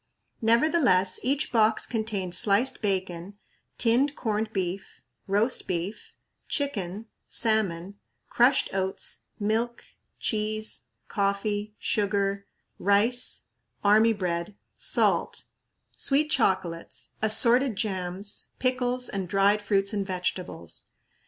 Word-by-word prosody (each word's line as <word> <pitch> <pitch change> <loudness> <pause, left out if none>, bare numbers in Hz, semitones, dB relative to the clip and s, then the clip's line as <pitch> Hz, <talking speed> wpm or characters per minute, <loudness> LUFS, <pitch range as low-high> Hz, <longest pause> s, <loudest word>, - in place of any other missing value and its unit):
Nevertheless 230 - +3
each 275 +4 0
box 220 -2 +2
contained 215 -6 -3
sliced 210 +8 +3
bacon, 190 -2 -2 0.4
tinned 255 +5 +2
corned 220 -1 -2
beef, 190 -1 -4 0.2
roast 210 +6 +2
beef, 180 +4 -4 0.3
chicken, 215 - -2 0.2
salmon, 205 -4 0 0.3
crushed 250 +3 +3
oats, 190 0 -1 0.2
milk, 225 +3 -1 0.3
cheese, 215 0 -1 0.2
coffee, 205 +1 -2
sugar, 200 -1 0 0.3
rice, 220 +5 +3 0.4
army 215 +2 +5
bread, 180 -1 -3 0.2
salt, - - +1 0.5
sweet 300 +2 +1
chocolates, 185 - 0
assorted 235 +3 +4
jams, 190 -1 -3
pickles, 255 -1 0
and 190 -3 -4
dried 200 +2 +3
fruits 200 0 +1
and 200 -2 -2
vegetables. 180 - -4
205 Hz, 95 wpm, -26 LUFS, 190-230 Hz, 0.5 s, army